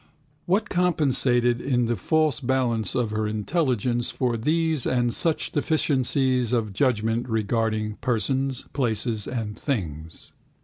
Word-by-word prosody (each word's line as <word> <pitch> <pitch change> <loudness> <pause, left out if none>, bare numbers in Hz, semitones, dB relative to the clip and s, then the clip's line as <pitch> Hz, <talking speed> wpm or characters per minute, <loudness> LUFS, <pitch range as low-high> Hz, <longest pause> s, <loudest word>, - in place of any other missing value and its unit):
What 200 +4 +1
compensated 130 -9 +2
in 125 -3 +1
the 120 +1 0
false 155 - +1
balance 120 -5 0
of 120 -3 0
her 110 0 -1
intelligence 120 - -1
for 125 -1 -1
these 155 +4 0
and 120 -2 +1
such 165 -2 +1
deficiencies 130 -5 +1
of 110 -4 0
judgment 115 0 0
regarding 110 -1 -1
persons, 130 +2 -1
places 115 -4 -1
and 110 -4 -4
things? 80 - -5
120 Hz, 120 wpm, -24 LUFS, 110-135 Hz, -, compensated